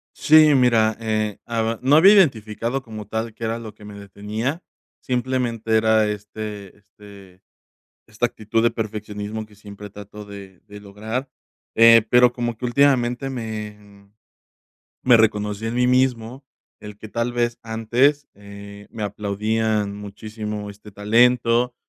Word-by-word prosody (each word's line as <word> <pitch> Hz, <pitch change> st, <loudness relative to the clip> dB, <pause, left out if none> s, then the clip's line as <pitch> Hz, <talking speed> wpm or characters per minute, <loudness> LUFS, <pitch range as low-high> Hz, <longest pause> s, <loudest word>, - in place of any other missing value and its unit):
Sí, 155 Hz, -1 st, +5 dB
mira, 115 Hz, -4 st, +3 dB
eh, 110 Hz, -2 st, -2 dB
aba 115 Hz, -1 st, -2 dB
no 135 Hz, +3 st, +3 dB
había 190 Hz, +6 st, +7 dB
identificado 125 Hz, -, +1 dB
como 110 Hz, -3 st, -9 dB
tal 110 Hz, +1 st, -4 dB
que 115 Hz, -, -11 dB
era 115 Hz, +1 st, -2 dB
lo 110 Hz, -3 st, -9 dB
que 105 Hz, -, -18 dB
me 105 Hz, 0 st, -10 dB
detenía, 105 Hz, -, -5 dB, 0.4 s
simplemente 125 Hz, -3 st, -2 dB
era 110 Hz, -1 st, +3 dB
este 105 Hz, -1 st, -7 dB
este 100 Hz, -2 st, -17 dB, 0.7 s
esta 110 Hz, +2 st, -1 dB
actitud 115 Hz, -1 st, -2 dB
de 115 Hz, -, +3 dB
perfeccionismo 105 Hz, -1 st, -5 dB
que 105 Hz, -1 st, -21 dB
siempre 105 Hz, 0 st, -11 dB
trato 105 Hz, +1 st, -11 dB
de 100 Hz, -2 st, -12 dB
de 105 Hz, 0 st, -11 dB
lograr, 110 Hz, +6 st, -6 dB, 0.5 s
eh, 115 Hz, 0 st, +7 dB
pero 125 Hz, 0 st, +5 dB
como 120 Hz, -2 st, -3 dB
que 125 Hz, -, -9 dB
últimamente 130 Hz, 0 st, +1 dB
me, 110 Hz, -4 st, -6 dB
mm, 100 Hz, 0 st, -21 dB, 0.9 s
me 125 Hz, -2 st, +6 dB
reconocí 105 Hz, -1 st, 0 dB
en 115 Hz, -, -3 dB
mí 125 Hz, 0 st, +2 dB
mismo, 130 Hz, 0 st, 0 dB, 0.3 s
el 105 Hz, -1 st, -11 dB
que 110 Hz, 0 st, -11 dB
tal 115 Hz, +2 st, -2 dB
vez 120 Hz, 0 st, -1 dB
antes, 120 Hz, +6 st, +1 dB
eh, 100 Hz, 0 st, -12 dB
me 110 Hz, -2 st, -7 dB
aplaudían 105 Hz, +1 st, -2 dB
muchísimo 105 Hz, +1 st, -7 dB
este 105 Hz, +1 st, -13 dB
talento, 120 Hz, +3 st, +2 dB
110 Hz, 145 wpm, -21 LUFS, 105-120 Hz, 0.9 s, había